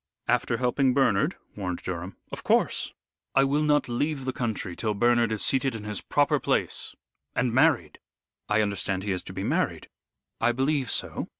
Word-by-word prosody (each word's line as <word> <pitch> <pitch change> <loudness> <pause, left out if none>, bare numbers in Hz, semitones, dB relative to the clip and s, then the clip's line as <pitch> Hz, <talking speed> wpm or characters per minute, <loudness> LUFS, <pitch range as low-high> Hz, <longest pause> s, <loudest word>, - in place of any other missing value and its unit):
"After 115 - +1
helping 125 +1 +2
Bernard?" 120 -8 +3 0.2
warned 90 -4 -4
Durham. 90 +1 -5
"Of - - -6
course. - - +1 0.4
I 135 - +6
will 140 +2 +2
not 150 -1 +2
leave 135 +3 -1
the 130 - -1
country 110 -6 -3
till 110 +1 -1
Bernard 120 +1 +3
is 110 - 0
seated 135 -2 +2
in 110 - -6
his 105 -2 -3
proper - - +2
place, - - -1 0.4
and 120 -3 +1
married 130 - +3 0.5
I 105 +1 +3
understand 95 -2 -2
he 100 - -2
is 90 - -1
to 95 - -9
be 95 +1 -4
married." - - -1 0.5
"I 120 +1 +3
believe 135 0 0
so. - - -1
115 Hz, 175 wpm, -27 LUFS, 100-135 Hz, 0.5 s, I